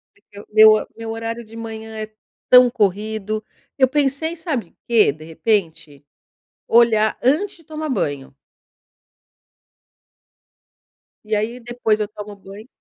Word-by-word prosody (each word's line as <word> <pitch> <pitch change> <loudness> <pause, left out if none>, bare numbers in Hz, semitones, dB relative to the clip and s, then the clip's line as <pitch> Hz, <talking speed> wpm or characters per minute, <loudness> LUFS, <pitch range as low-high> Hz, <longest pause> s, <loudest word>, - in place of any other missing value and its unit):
É 410 - -29
que 205 0 -11
meu 215 0 +6
meu 225 0 -6
horário 230 +1 -5
de 225 +1 -15
manhã 220 -1 -7
é 215 0 -6 0.4
tão 250 0 +8
corrido. 215 0 -1 0.3
Eu 260 -2 +5
pensei 295 +4 0
sabe 275 - -3
o - - -36
quê 225 -10 +4
de 155 +2 -13
repente? 160 -5 -2 0.6
Olhar 225 -2 +3
antes 305 +12 +1
de 330 - -21
tomar 310 0 -5
banho. 145 - -3 2.9
E 215 0 -1
aí 230 +4 -2
depois 230 -2 -1
eu 210 - -1
tomo 210 -1 -9
banho 200 +3 -13
220 Hz, 130 wpm, -20 LUFS, 210-245 Hz, 2.9 s, tão